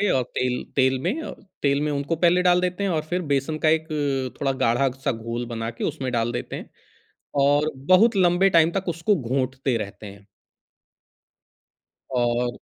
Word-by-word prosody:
और 130 - +2
तेल 125 -1 -1
तेल 130 -1 +3
में 210 - -1
अ, - - -6 0.3
तेल 140 0 +2
में 150 0 0
उनको 145 +3 -1
पहले 175 +2 +3
डाल 180 0 +4
देते 180 +2 -2
हैं 200 - 0
और 160 -3 0
फिर 175 +3 -2
बेसन 140 +3 0
का - - +6
एक 160 0 +1 0.5
थोड़ा 135 -1 +1
गाढ़ा-सा 130 +3 +1
घोल 115 +1 -4
बना 115 -1 -4
के 115 - -7
उसमें 135 -5 -2
डाल 120 -1 0
देते 120 - -5
हैं। - - -8 0.7
और 145 +2 +3
बहुत 185 - +4
लंबे 185 +1 +4
टाइम 165 -2 +5
तक 195 0 -3
उसको 170 +5 +1
घूँटते 130 +1 -1
रहते 105 0 -6
हैं। 100 0 -12 1.9
और 120 0 +1
140 Hz, 170 wpm, -24 LUFS, 125-170 Hz, 1.9 s, का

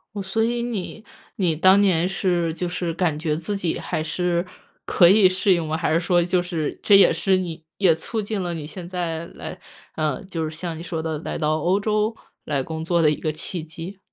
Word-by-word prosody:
哦， 200 - -3
所 210 +4 0
以 235 +1 0
你 220 -2 -5 0.3
你 180 -7 +1
当 185 +5 +6
年 180 -3 +3
是 175 -3 0
就 180 - -2
是 175 -1 -2
感 165 -3 0
觉 155 -1 -1
自 170 +6 -3
己 175 -4 -1
还 160 -3 -3
是 175 +2 -1 0.4
可 175 - +5
以 195 0 +6
适 185 +1 +2
应 170 -2 0
吗？ 155 +1 -1
还 165 -1 0
是 165 - +4
说 175 0 +2
就 180 +1 +1
是 170 -4 -3
这 200 -2 +6
也 195 - +6
是 190 -1 +2
你 165 -3 -5
也 185 -4 +5
促 220 +7 -4
进 210 -1 -2
了 175 -1 -2
你 155 -2 -6
现 175 +3 -8
在 170 -2 -3
来 - - -9 0.4
呃， 155 +1 -1
就 165 -4 -3
是 155 - -9
像 165 0 -5
你 - - -7
说 165 -2 -4
的 160 -2 -2
来 - - -4
到 155 0 +1
欧 180 +5 +2
洲 215 +1 0 0.3
来 140 -3 -1
工 160 +2 -5
作 170 0 +2
的 150 - +5
一 - - 0
个 155 - -2
契 160 +2 -5
机？ 165 +5 -9
175 Hz, 240 characters per minute, -23 LUFS, 160-190 Hz, 0.4 s, 当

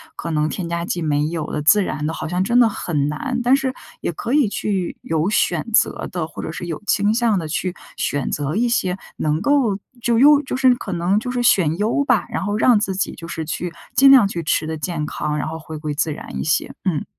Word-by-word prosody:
可 170 - -5
能 155 -1 +1
添 175 -4 -4
加 170 0 -2
剂 175 - -3
没 150 -2 +1
有 160 -1 -3
的， 150 - -2
自 205 +7 +5
然 150 -4 -3
的 160 - -2
好 155 - -5
像 180 +3 0
真 235 +5 +3
的 235 -2 +6
很 150 -8 -2
难。 245 - -3
但 250 +2 +5
是 270 -1 -1 0.3
也 - - -1
可 235 - -4
以 290 -5 +4
去 195 -4 -2
有 160 +3 0
选 175 -6 +1
择 - - +2
地， 175 -3 -2
或 160 - -8
者 160 - -4
是 175 +2 -6
有 165 +2 -5
倾 205 +1 +2
向 225 -4 +2
地 160 - -5
去 175 +3 -2 0.2
选 145 -2 -1
择 145 +2 -2
一 240 +3 +1
些 185 -6 0 0.2
能 155 +1 0
够 250 -5 +2 0.2
就 235 -1 +2
优 290 +2 +7
就 265 - -4
是 260 -1 +4
可 200 -5 -6
能 175 +4 +1
就 250 +3 -4
是 250 -1 -1
选 170 -9 +3
优 220 +8 +1
吧， 245 -5 +2
然 - - -3
后 205 +1 -1
让 230 0 +5
自 195 -3 -2
己 195 - -1
就 165 - -9
是 165 -1 -4
去 170 +2 -4 0.2
尽 270 +3 +7
量 255 -7 +7
去 170 -3 -4
吃 155 0 0
得 160 0 -3
健 155 -1 -3
康， 150 0 -3
然 - - -2
后 160 +1 -5
回 160 -1 -8
归 150 -1 -3
自 155 +1 0
然 - - -7
一 - - -2
些， 150 - 0
嗯。 170 -6 0
180 Hz, 265 characters per minute, -20 LUFS, 155-230 Hz, 0.3 s, 优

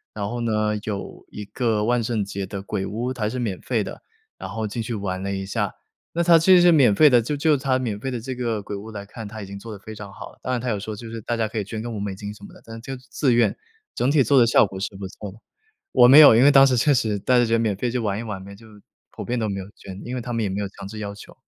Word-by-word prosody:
然 100 -2 -3
后 120 +2 -4
呢， 110 -2 0
有 100 -2 -6
一 105 - -8
个 110 0 -1
万 120 0 +1
圣 110 -3 -1
节 100 0 -5
的 100 -2 -6
鬼 100 0 -3
屋， 120 +5 -3
它 120 - -10
还 105 - +1
是 125 +3 -4
免 105 -7 -3
费 - - -1
的， - - -8 0.4
然 95 - -7
后 110 +1 -3
进 115 +3 -4
去 115 +2 -4
玩 95 -3 -3
了 100 0 -2
一 95 0 -4
下。 95 - -2 0.4
那 170 - 0
它 170 -1 +6
其 175 +4 +5
实 180 - +7
是 175 -1 +6
免 135 -9 +5
费 150 +8 +6
的， 120 -3 +5
就 145 +6 -3
就 155 +1 +3
它 130 -1 0
免 115 -5 -3
费 130 +5 -4
的 125 - -3
这 130 +3 -5
个 115 -4 -2
鬼 100 - -6
屋 105 +3 -8
来 100 -2 -7
看， 110 +2 -9
它 110 +1 -8
已 - - -6
经 100 +1 -8
做 115 +3 -9
得 105 - -8
非 110 +2 -10
常 100 -1 -9
好 - - -10
了， - - -25
当 130 - -3
然 125 - 0
它 125 +1 -3
有 105 - 0
说 110 +2 -6
就 115 +2 -9
是 115 0 -7
大 120 +2 -2
家 110 -1 0
可 110 - -7
以 105 - 0
捐 110 +2 -6
个 120 - -5
5 110 -3 -5
美 100 -1 -3
金 105 +1 -7
什 105 - -17
么 - - -11
的， - - -16
但 115 0 -9
就 135 +2 -6
自 130 +1 -1
愿， 120 0 +2 0.4
整 130 - +1
体 145 -1 +4
做 140 +2 +3
的 120 - +7
效 115 - +5
果 95 -1 -8
是 100 - -4
不 95 -1 -6
错 100 +1 -9
的 105 - -16 0.6
我 120 - +7
没 140 +4 +10
有， 145 -7 +9
因 120 - +5
为 145 - +7
当 135 -1 +7
时 130 - +2
确 145 +5 +3
实 110 -5 0
大 125 +6 +2
家 120 - +4
就 115 0 +2
免 110 -3 0
费 120 +4 -1
去 120 - -2
玩 105 -3 -2
一 - - -5
玩 105 -4 -6
呗， 100 +1 -10
就 110 +3 -16 0.4
普 - - -7
遍 125 0 -2
都 110 - -1
没 100 -1 -3
有 - - -8
捐， 95 0 -10
因 125 - -4
为 - - -2
他 120 +1 -5
们 115 -1 -1
也 100 - -1
没 95 +2 -3
有 100 - -2
强 95 - -11
制 110 +2 -8
要 100 -1 -5
求。 105 - -14
110 Hz, 345 characters per minute, -23 LUFS, 100-125 Hz, 0.6 s, 没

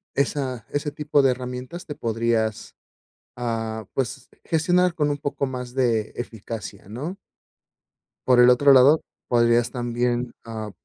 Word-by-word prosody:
esa 130 -4 -1
ese 145 +1 -2
tipo 150 0 +1
de 135 -1 +4
herramientas 125 +6 -6
te 150 - -6
podrías, 115 -1 -1 0.6
ah, 115 -3 -3
pues 130 0 -3 0.2
gestionar 175 +2 +2
con 150 -3 +1
un 145 - 0
poco 145 -1 -2
más 125 -1 -6
de 115 -5 +1
eficacia, 110 -4 -7
¿no? 145 - -5 1.1
Por 125 -1 +5
el 125 0 +8
otro 140 +3 +6
lado, 135 +4 +6 0.3
podrías 120 0 +3
también, 120 0 -1
ah 110 -2 -6
125 Hz, 135 wpm, -24 LUFS, 115-145 Hz, 1.1 s, el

